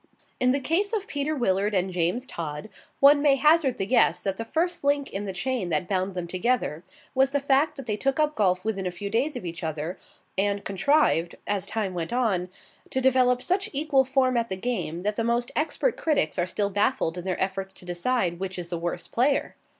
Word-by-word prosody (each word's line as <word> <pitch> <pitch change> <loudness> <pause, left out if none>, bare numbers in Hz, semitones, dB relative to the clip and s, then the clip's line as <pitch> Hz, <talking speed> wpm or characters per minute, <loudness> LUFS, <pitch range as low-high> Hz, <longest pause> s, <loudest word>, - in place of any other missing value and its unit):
In 250 - +3
the 270 +2 +2
case 360 - 0
of 420 -3 -1
Peter 295 -3 -2
Willard 205 -4 +1
and 185 0 +1
James 180 +9 0
Todd, 155 - -6 0.3
one 285 +1 +7
may 285 -2 +5
hazard 300 -1 +3
the 195 - -1
guess 250 +5 +3
that 195 -1 -2
the 230 - -3
first 340 +6 -1
link 285 0 +1
in 200 +1 -3
the 195 - -3
chain 215 0 -2
that 160 +2 0
bound 190 0 -1
them 180 -1 -3
together 185 -3 -1 0.3
was 265 0 +3
the 285 +1 0
fact 280 +2 +2
that 270 - -8
they 210 -2 -2
took 270 +5 0
up 305 0 +2
golf 185 -5 +1
within 195 -4 -1
a - - 0
few 200 +3 -6
days 265 +7 0
of - - -6
each 170 0 -6
other, 160 +2 -4 0.4
and 200 0 0
contrived, 200 - +2
as 200 -1 -2
time 210 -4 -2
went 170 +1 -4
on, 210 -8 0 0.4
to 260 - -1
develop 255 -1 +3
such 380 +2 0
equal 285 -1 +3
form 260 -1 +2
at 230 0 0
the 190 - -1
game 185 -6 -3
that 210 +1 -1
the 230 - 0
most 235 +1 0
expert 320 +10 0
critics 290 - +1
are 175 - +1
still 200 +2 -1
baffled 205 -3 +1
in 180 - -6
their 185 -1 -2
efforts 190 0 -2
to - - -9
decide 175 0 -1
which 190 -1 -4
is 175 -1 -6
the 170 -1 -3
worse 175 0 -3
player. 270 +4 0
220 Hz, 220 wpm, -26 LUFS, 185-270 Hz, 0.4 s, one